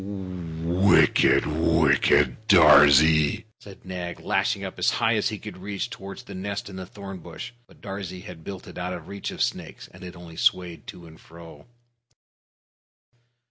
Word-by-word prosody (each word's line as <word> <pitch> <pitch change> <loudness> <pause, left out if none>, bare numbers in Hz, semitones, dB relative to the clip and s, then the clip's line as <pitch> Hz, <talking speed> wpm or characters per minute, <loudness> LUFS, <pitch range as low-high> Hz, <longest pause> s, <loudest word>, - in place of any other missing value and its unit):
"Wicked, 90 -2 +2
wicked 80 -3 +2
Darzee!" 75 -3 +6
said 100 -2 -15
Nag, 90 -2 -6
lashing - - 0
up - - -7
as - - +3
high 110 - +1
as 110 +2 +1
he 110 - -5
could 105 -1 -10
reach 100 +1 -5
toward 95 0 -9
the 100 - -11
nest 100 +1 -5
in - - -10
the 95 -1 -7
thorn 95 -2 -9
bush. - - -9 0.2
But - - -22
Darzee 95 -2 -7
had 90 -5 -11
built 95 +1 -8
it - - -10
out 90 +1 -3
of 85 -3 -9
reach 100 -1 -6
of - - -2
snakes, - - -5
and 95 - -15
it 90 0 -9
only 85 -2 -12
swayed 90 -2 0
to 85 - -10
and 80 -1 -15
fro. 85 -3 -14
90 Hz, 165 wpm, -24 LUFS, 80-100 Hz, 0.2 s, Darzee